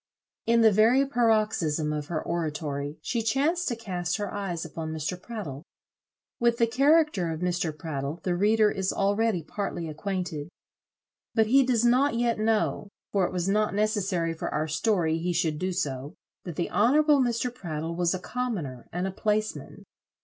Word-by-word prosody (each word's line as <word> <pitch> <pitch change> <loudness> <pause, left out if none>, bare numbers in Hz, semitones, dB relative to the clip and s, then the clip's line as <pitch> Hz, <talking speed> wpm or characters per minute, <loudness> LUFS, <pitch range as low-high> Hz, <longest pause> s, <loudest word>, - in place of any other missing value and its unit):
In 230 0 +4
the 220 -1 +7
very 230 +7 +4
paroxysm 215 - +1
of 150 -1 -4
her 160 -2 -2
oratory 150 -3 -3
she 235 - -1
chanced 285 +10 +1
to 240 - 0
cast 180 -5 -3
her 205 -3 -4
eyes 185 -5 -3
upon 160 0 -5
Mr. 160 +3 -4
Prattle. 190 - -6 0.8
With 235 0 +3
the 230 - +4
character 275 - +3
of 160 +1 -5
Mr. 180 -2 0
Prattle, 150 -1 -4
the 180 - 0
reader 210 +3 +3
is 190 -1 -1
already 200 -2 +1
partly 175 -1 -4
acquainted. 165 -2 -4 0.9
But 220 -2 +4
he 265 +5 +5
does 245 -3 +2
not 255 +3 +3
yet 235 -1 +1
know, 215 -2 0 0.2
for 195 -3 +2
it - - -7
was 180 0 -2
not 210 +1 +1
necessary 195 -6 0
for 160 - -4
our 155 +1 -1
story 165 -1 +1
he 175 +2 -1
should 160 -3 0
do 185 +1 -1
so, 145 -6 -3 0.3
that 175 -4 -6
the 170 - -2
honourable 290 +6 +4
Mr. 240 -1 0
Prattle 165 -6 -4
was 175 +1 +1
a - - -4
commoner 180 - -4
and 180 +2 -2
a 190 - -2
placeman. 215 +2 -2
195 Hz, 170 wpm, -27 LUFS, 165-230 Hz, 0.9 s, the